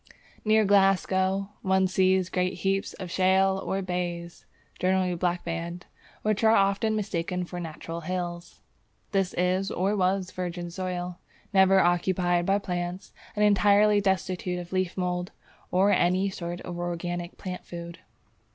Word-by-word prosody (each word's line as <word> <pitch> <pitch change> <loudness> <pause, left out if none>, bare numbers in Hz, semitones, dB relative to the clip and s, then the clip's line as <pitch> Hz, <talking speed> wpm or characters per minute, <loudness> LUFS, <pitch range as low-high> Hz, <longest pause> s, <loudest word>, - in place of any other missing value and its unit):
Near 215 0 +4
Glasgow 195 0 +2
one 190 0 +2
sees 185 0 +2
great 180 0 0
heaps 195 0 -1
of 185 -3 -7
shale 190 +1 +3
or 195 0 -2
blaes 175 -1 -4 0.3
(generally 185 -1 +1
blackband), 170 0 -3 0.4
which 215 0 0
are 220 0 +6
often 200 +2 +2
mistaken 180 -3 -2
for 175 0 -7
natural 165 0 -6
hills. 175 0 -5 0.5
This 195 -3 0
is 185 +2 +1
or 195 +4 0
was 185 -1 0
virgin 175 -1 -4
soil, 180 -1 -4 0.3
never 190 0 +6
occupied 175 0 +1
by 195 +1 +4
plants, 180 -1 -4 0.2
and 210 0 +3
entirely 205 +1 +5
destitute 185 -2 -1
of 175 +1 -7
leaf 185 -1 -1
mould 180 -1 -2 0.4
or 195 +3 +3
any 185 +2 +2
sort 175 -1 -5
of 175 -1 -6
organic 175 0 -4
plant 185 -2 -6
food. 170 -1 -8
185 Hz, 135 wpm, -27 LUFS, 175-195 Hz, 0.5 s, are